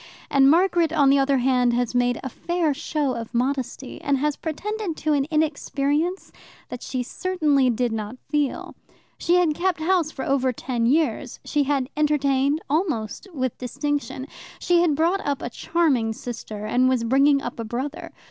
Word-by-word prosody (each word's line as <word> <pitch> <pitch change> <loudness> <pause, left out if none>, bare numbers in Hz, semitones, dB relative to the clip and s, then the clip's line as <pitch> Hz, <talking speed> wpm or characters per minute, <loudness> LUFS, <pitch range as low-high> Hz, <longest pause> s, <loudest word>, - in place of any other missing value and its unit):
And 275 -1 +5
Margaret, 340 0 +3
on 285 -4 +4
the 280 - +4
other 275 0 +2
hand, 250 -1 +2
has 245 0 0
made 245 -1 +1
a 265 - -3
fair 340 +3 -1
show 295 -1 -1
of 230 0 -6
modesty, 260 +1 -2
and 280 -1 +1
has 295 +2 0
pretended 390 +2 -4
to 305 0 0
an 280 -1 +1
inexperience 305 +2 -1 0.4
that 250 - -7
she 255 -2 -3
certainly 300 -4 +1
did 245 0 0
not 220 +2 -4
feel. 290 -2 -1 0.5
She 345 - +2
had 355 -4 +3
kept 355 +1 0
house 335 -1 +1
for 270 -4 -6
over 265 -2 +1
ten 240 -1 -2
years; 270 -3 0
she 295 -2 +1
had 275 -2 0
entertained, 290 -1 +2
almost 295 - -1
with 260 -6 -3
distinction; 275 +1 -3 0.3
she 350 -1 +2
had 330 -4 +2
brought 340 +6 +1
up 285 -1 -2
a 240 - -4
charming 280 -8 +1
sister, 220 -3 -7
and 250 +4 +3
was 255 -3 +1
bringing 275 +4 +4
up 275 - -6
a - - -2
brother. 255 +7 -5
280 Hz, 170 wpm, -23 LUFS, 250-315 Hz, 0.5 s, And